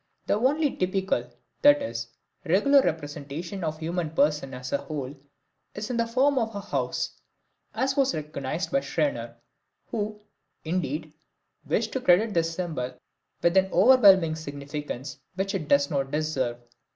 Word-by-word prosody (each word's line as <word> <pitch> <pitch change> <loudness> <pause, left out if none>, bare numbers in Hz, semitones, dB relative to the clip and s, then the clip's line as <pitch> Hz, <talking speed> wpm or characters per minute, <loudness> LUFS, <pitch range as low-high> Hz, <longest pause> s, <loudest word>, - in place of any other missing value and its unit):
The - - +1
only 280 +7 +2
typical, 185 -9 0 0.3
that 290 0 +7
is, 115 - -4 0.4
regular 210 - +5
representation 160 - -4
of 155 -1 -1
the 160 0 -7
human 170 -1 -1
person 150 -3 +1
as 125 0 -6
a 140 - +2
whole 145 -3 -5 0.6
is 210 +4 -4
in 240 - -1
the 230 0 +1
form 265 +4 +3
of 225 -2 -2
a - - -2
house, 200 - -3 0.5
as 270 +1 0
was 275 -1 +2
recognized 150 +1 -4
by 275 - +3
Scherner 285 +1 -2 0.6
who, 210 -1 -3 0.5
indeed, 155 -2 -2 0.5
wished - - 0
to 260 - -1
credit 210 0 +4
this 165 -1 +1
symbol 140 -9 -3 0.5
with 170 +1 +3
an 190 0 +4
overwhelming 190 -6 +6
significance 145 -2 -6 0.2
which 195 +1 -1
it 170 -7 -3
does 140 0 +3
not 135 -2 0
deserve. 140 -5 -1
170 Hz, 150 wpm, -26 LUFS, 145-210 Hz, 0.6 s, that